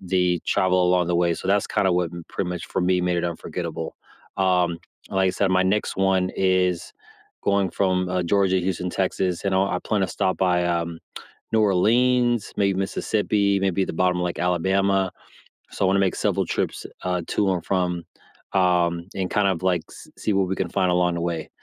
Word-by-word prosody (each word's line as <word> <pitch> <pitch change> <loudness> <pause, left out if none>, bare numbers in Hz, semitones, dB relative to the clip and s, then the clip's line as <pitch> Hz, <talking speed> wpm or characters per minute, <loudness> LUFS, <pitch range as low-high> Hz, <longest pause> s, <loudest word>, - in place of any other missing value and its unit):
the 90 -1 +1
travel 95 -1 +2
along 90 -1 +2
the 85 0 +1
way. 85 0 +2
So 95 - -6
that's 100 0 +2
kinda 95 - +1
what 90 -2 0 0.2
pretty 90 - -3
much 90 -1 -5
for - - -2
me 90 0 +2
made 90 0 0
it 85 - -1
unforgettable. 85 -1 -5 0.4
Um, 90 -3 +2 0.3
like 95 -1 +2
I - - +2
said, 95 +1 0
my 95 0 +3
next 95 +2 0
one 95 -1 +2
is 90 -2 +1 0.5
going 100 -1 +1
from, 90 -2 0
uh, 90 -1 0
Georgia 95 +1 +2
to - - -3
Houston, 90 -1 -2
Texas, 90 -1 -1
and 100 -1 +1
I'll 95 +1 +2
I 90 - -1
plan 105 +2 -1
to - - +2
stop 95 +1 -1
by, 90 -2 +2
um, 85 -1 -2 0.5
New 110 - +3
Orleans, 120 +4 +2
maybe 100 -1 +2
Mississippi, 100 0 0
maybe 95 0 +1
the - - -4
bottom 90 +1 +1
of 90 - -1
like 90 - -3
Alabama. 95 +2 +1 0.6
So, 95 - -1
I - - +3
wanna 95 +1 +3
make 95 -2 +2
several - - 0
trips, - - -3 0.2
uh, 90 -1 -1
to 100 -2 +1
and 85 -2 -4
from, 90 -2 -1 0.5
um, 90 -2 +2
and 95 -1 -1
kind 105 -1 +2
of 95 -2 -1
like 90 -3 +2
s - - -13
see - - -1
what 95 -1 +2
we 95 - -2
can - - -2
find 95 -2 +1
along 90 -1 +2
the 85 - -3
way, 85 -2 -3
95 Hz, 205 wpm, -23 LUFS, 90-95 Hz, 0.6 s, my